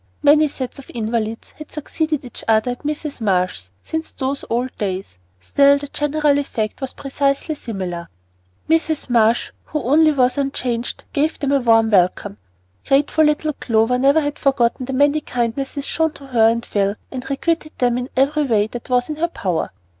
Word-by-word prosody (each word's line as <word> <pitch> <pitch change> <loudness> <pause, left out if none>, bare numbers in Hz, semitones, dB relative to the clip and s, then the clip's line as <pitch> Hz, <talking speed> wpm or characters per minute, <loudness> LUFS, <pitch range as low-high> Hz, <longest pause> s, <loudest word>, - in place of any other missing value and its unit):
Many 300 +1 +6
sets 265 -2 -6
of 275 - -13
invalids 225 0 -2
had 305 - -10
succeeded 305 -1 -2
each 245 - -7
other 220 +2 +3
at 245 - -6
Mrs. 300 -2 -4
Marsh's 180 - 0
since 320 0 -4
those 275 +1 -3
old 245 +2 -1
days; 190 - -4 0.2
still 280 - +4
the 285 0 -7
general 295 -1 +1
effect 220 -6 -3
was 265 - -3
precisely 275 +2 -1
similar. 185 - -5 0.6
Mrs. 320 -4 0
Marsh, 230 0 +3
who 300 -3 -3
only 310 +5 +5
was 255 -1 +2
unchanged, 245 -4 -2
gave 305 +3 +1
them 280 -2 -1
a 280 - +4
warm 225 -2 +4
welcome. 180 - +2 0.5
Grateful 290 +3 +3
little 300 0 +1
Clover 230 0 +1
never 280 +4 +4
had 290 -1 -3
forgotten 255 -2 +1
the 270 - -3
many 285 +3 +3
kindnesses 270 +3 -2
shown 320 -1 0
to 280 - -12
her 230 -4 +4
and 235 +1 -1
Phil, 200 0 0 0.2
and 260 0 -6
requited 310 +3 -1
them 245 -1 +2
in 250 +1 -5
every 290 +3 +2
way 215 -5 +2
that 235 +3 -8
was 245 -1 +2
in 305 - -5
her 335 +2 +1
power. 190 - -2
265 Hz, 175 wpm, -20 LUFS, 230-290 Hz, 0.6 s, Many